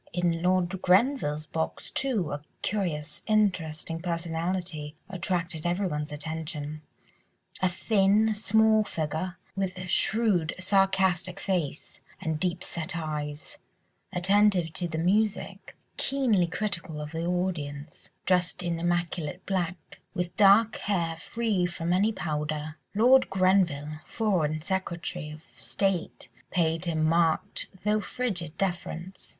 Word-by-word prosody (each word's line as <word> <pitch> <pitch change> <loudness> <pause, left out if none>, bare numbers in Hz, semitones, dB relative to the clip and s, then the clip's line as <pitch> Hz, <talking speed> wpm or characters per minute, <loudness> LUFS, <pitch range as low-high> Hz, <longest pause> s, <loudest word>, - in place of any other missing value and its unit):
In 170 -1 +1
Lord 185 +1 +1
Grenville's 185 - +3
box, 160 +2 -3
too, 230 - 0
a 145 - -3 0.2
curious, 165 -7 -2
interesting 165 -7 +1
personality 170 -2 -3
attracted 175 -3 -2
everyone's 175 -5 -1
attention; 155 0 -5 0.8
a 185 - +4
thin, 205 +3 +3
small 220 +1 +4
figure 160 +1 -3 0.2
with 190 -1 -2
shrewd, 195 -5 +2
sarcastic 190 -2 +2
face 170 -7 -2 0.2
and 160 -1 -2
deep 180 0 -1
set 165 +1 -3
eyes, 150 - -5 0.5
attentive 190 -2 +3
to 175 - -1
the 160 -1 -4
music, 205 +5 0 0.2
keenly 240 -10 +2
critical 175 -4 -3
of 150 0 -5
the 165 +1 -3
audience, 160 -5 -3 0.2
dressed 180 -1 +1
in 170 -1 -1
immaculate 175 -1 -1
black, 180 -3 -3 0.2
with 180 -1 -2
dark 210 +2 +6
hair 170 -5 -1
free 200 +1 0
from 175 0 -2
any 200 +4 +3
powder. 150 -4 -3 0.2
Lord 255 +5 +6
Grenville—Foreign 170 -1 +1
Secretary 175 -3 -3
of 155 +1 -10
State—paid 160 - -1
him 160 -2 0
marked, 165 0 +2 0.2
though 210 0 +3
frigid 180 -8 -3
deference. 180 -1 -3
175 Hz, 110 wpm, -28 LUFS, 160-195 Hz, 0.8 s, dark